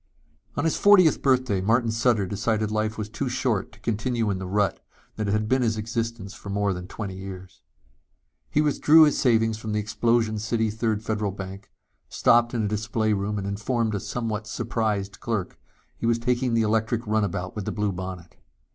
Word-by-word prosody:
On 145 - 0
his 165 - +2
fortieth 190 -6 +6
birthday 130 -7 +2
Martin 115 +3 +2
Sutter 115 -2 +2
decided 105 +2 -1
life 110 0 -1
was 105 -1 -3
too 125 +4 -3
short 125 -5 -1
to 100 - -18
continue 115 0 -1
in 95 - -2
the 95 - -5
rut 100 +1 0 0.3
that 110 -1 -2
had 105 +1 0
been 130 +3 +2
his 110 -2 +1
existence 115 -2 -3
for 100 - -10
more 100 0 0
than 90 0 -7
twenty 100 -1 -6
years. 95 -1 -9 0.9
He 150 - +2
withdrew 155 +1 +6
his 150 -2 +3
savings 115 -3 +2
from 110 -1 -4
the 105 - +1
Explosion 110 +1 +1
City 110 0 0
Third 110 -1 -1
Federal 105 -2 -1
Bank, 95 0 -8 0.4
stopped 120 +1 +3
in 115 - 0
a - - +1
display 110 +1 0
room 105 +1 -2
and 100 - -3
informed 110 +3 -1
a 100 - -1
somewhat 110 -1 -3
surprised 105 -4 -2
clerk 110 -6 -3 0.4
he 115 - -3
was 115 0 +3
taking 120 0 0
the 115 - +3
electric 110 +2 0
runabout 100 -4 -1
with 105 -3 -4
the - - -2
blue 105 -1 -1
bonnet. 90 -2 -7
110 Hz, 185 wpm, -25 LUFS, 100-115 Hz, 0.9 s, fortieth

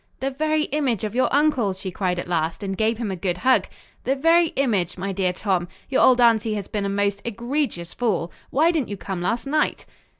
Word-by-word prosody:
"The 270 +1 -1
very 310 +2 0
image 265 -9 0
of 215 -1 -3
your 255 +2 +2
uncle," 280 -8 +2
she 190 0 -6
cried 180 -1 -1
at 175 - -4
last, 165 +1 -1
and 195 -1 -2
gave 220 +3 +1
him 225 -4 -3
a - - -2
good 180 0 -2
hug. 255 +7 +3 0.4
"The 270 - +1
very 330 +4 +4
image, 205 -11 0
my 195 +2 -3
dear 190 -1 0
Tom. 180 -2 -1 0.2
Your 270 - +2
old 255 -1 +6
aunty 225 -2 +4
has 200 -2 -4
been 205 -2 -2
a - - -1
most 200 0 0
egregious 235 - -3
fool. 200 -8 -1 0.2
Why 315 +5 +3
didn't 310 -8 -1
you 205 - -4
come 190 -2 -5
last 230 +8 -1
night?" 305 +2 0
215 Hz, 220 wpm, -23 LUFS, 190-265 Hz, 0.4 s, old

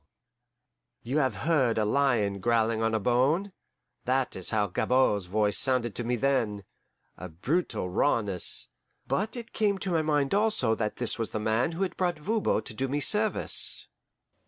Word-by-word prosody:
You 130 +6 -1
have 130 -7 +1
heard 135 -9 +2
a 110 - +2
lion 110 -5 +1
growling 115 0 +1
on 115 0 +1
a - - +1
bone. 135 - +1 0.5
That 130 +1 0
is 95 - -1
how 105 -2 +1
Gabord's 105 -1 +1
voice 105 0 +1
sounded 125 -4 +1
to 120 - -4
me 120 +1 0
then 120 -6 0 0.6
a 90 - -7
brutal 110 - -2
rawness; 100 -1 0 0.4
but 215 +4 -1
it 235 -1 -9
came 205 -2 +1
to 190 -1 -4
my 165 -2 +2
mind 150 -1 0
also 205 - +3
that 105 -1 -2
this 120 -1 -1
was 115 - -2
the - - -4
man 110 +8 0
who 180 +4 -2
had 190 - -4
brought 175 -3 0
Voban 210 +8 0
to - - -8
do 130 +5 -2
me 140 +3 -1
service! 210 +8 +1
125 Hz, 170 wpm, -28 LUFS, 110-155 Hz, 0.6 s, also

